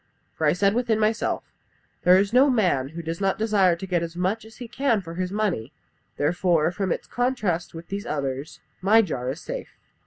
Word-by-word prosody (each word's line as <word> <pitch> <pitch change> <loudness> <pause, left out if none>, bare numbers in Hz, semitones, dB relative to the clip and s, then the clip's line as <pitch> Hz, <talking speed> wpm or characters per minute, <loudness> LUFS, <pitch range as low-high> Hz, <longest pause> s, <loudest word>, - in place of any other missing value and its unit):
For 155 - 0
I 150 - +4
said 200 +3 +2
within 235 -2 +1
myself, 220 +1 0 0.6
'There 180 +1 +6
is 200 +2 +1
no 265 +3 +6
man 180 - +2
who 165 +2 -7
does 165 +3 -4
not 195 -1 +1
desire 205 -5 +3
to 175 - -7
get 180 -3 0
as 170 0 -5
much 190 +6 -1
as 220 0 -15
he 245 - -7
can 240 -2 +1
for 165 -4 -8
his 180 +1 -3
money, 190 - -1 0.5
therefore, 165 +1 +2
from 185 0 -2
its - - -2
contrast 215 -10 -1
with 165 +1 -9
these 200 +1 -4
others, 140 0 -3 0.2
my 215 +4 +5
jar 125 -9 -3
is 140 +6 -5
safe.' - - -7
185 Hz, 205 wpm, -25 LUFS, 165-220 Hz, 0.6 s, There